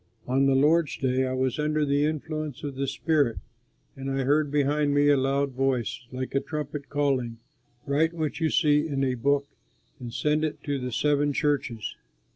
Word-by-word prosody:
On 135 +2 +2
the 135 - +3
Lord's 150 +3 +3
Day 130 0 +1
I 130 - -2
was 130 +1 -1
under 150 0 +1
the 140 +1 +2
influence 155 -2 -4
of 145 -2 -4
the 135 +1 -2
Spirit, 145 -5 +1 0.6
and 135 0 -5
I 135 0 0
heard 145 +2 +2
behind 145 0 +1
me 145 0 +4
a 145 - +6
loud 135 +1 +1
voice 125 -3 -1
like 130 0 -5
a 135 - +3
trumpet 150 -1 -5
calling, 135 -5 0 0.5
"Write 155 +4 +1
what 155 -2 -2
you 160 -1 +1
see 150 -1 +3
in 140 -3 -1
a 130 -1 +1
book 140 +3 +1 0.5
and 120 -2 -7
send 150 +5 0
it 150 -1 -3
to 145 -2 -2
the 125 0 -4
seven 145 +3 +1
churches." 135 -7 -1
140 Hz, 185 wpm, -26 LUFS, 130-150 Hz, 0.6 s, a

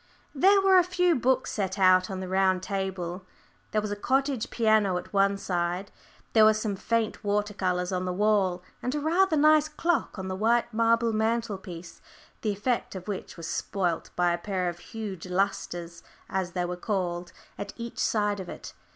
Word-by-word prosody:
There 385 +8 +5
were 385 -1 +6
a - - +4
few 360 -1 +2
books 260 -1 +1
set 200 -1 -2
out 185 -1 +5
on 190 -1 -4
the 185 - -5
round 185 0 +2
table, 190 -2 -3 0.5
there 215 - 0
was 210 - -3
a - - -1
cottage 265 +2 0
piano 215 -5 +2
at 180 - -8
one 200 0 +3
side, 180 0 -2 0.4
there 220 - +6
were 215 0 +6
some 215 -2 -2
faint 230 +2 -1
water 205 0 0
colours 180 -2 -1
on 185 0 -1
the 180 - -1
wall, 190 -2 +1 0.2
and 250 +3 -2
a - - 0
rather 330 +2 +2
nice 305 +1 +5
clock 335 -3 -1
on 190 -1 -5
the 185 - -3
white 230 +3 +1
marble 230 0 +2
mantelpiece, 215 -6 -3 0.4
the 215 - -1
effect 210 +2 -1
of 185 0 -7
which 200 -3 -5
was 165 - -7
spoilt 175 0 -2
by 175 -1 +2
a 170 - -2
pair 185 -1 -1
of 175 0 -7
huge 200 -5 -7
"lustres," 175 -2 -2 0.3
as 185 -2 -2
they 180 -1 -1
were 180 0 -3
called, 180 -2 -2 0.3
at 200 0 -5
each 235 0 -7
side 205 -2 +1
of 185 - -7
it. - - -9
200 Hz, 185 wpm, -27 LUFS, 185-230 Hz, 0.5 s, were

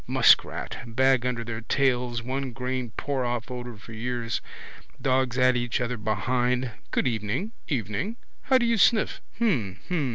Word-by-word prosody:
Muskrat. - - +4
Bag 130 +1 +3
under 120 -2 -2
their 115 -1 -5
tails. 125 -2 +1
One 130 +1 -3
grain 125 -1 -3
pour 135 -2 -1
off 120 +1 -2
odour 120 -2 -6
for 110 +2 -12
years. 120 +1 -2 0.6
Dogs 130 -1 +1
at 130 0 +5
each 120 -1 0
other 125 0 -1
behind. 120 +4 0 0.2
Good - - +1
evening. 115 - -1 0.2
Evening. 130 - -2 0.3
How 260 - +4
do 240 - +2
you 230 -2 +2
sniff? 220 +3 +3 0.2
Hm. 130 - +1
Hm. 160 -7 0
125 Hz, 155 wpm, -26 LUFS, 115-130 Hz, 0.6 s, at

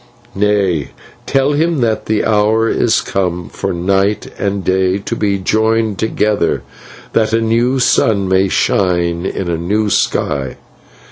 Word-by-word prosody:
"'Nay, 100 -7 +1 0.4
tell 135 +1 +2
him 160 +1 +1
that 110 -2 -1
the 110 -1 0
hour 110 +1 +2
is 115 0 +1
come 90 -2 -2
for 95 - -4
"Night" 95 +4 0
and 100 -1 -2
"Day" 95 0 +1
to 100 - -4
be 100 -2 0
joined 110 +1 0
together, 105 -4 0 0.5
that 110 0 +1
a 115 - +3
new 115 +3 +1
sun 105 -5 +2
may 95 +1 +2
shine 85 -2 0
in 95 - -4
a 85 -1 -1
new 105 +4 0
sky.' 70 -3 0
100 Hz, 140 wpm, -15 LUFS, 95-110 Hz, 0.5 s, a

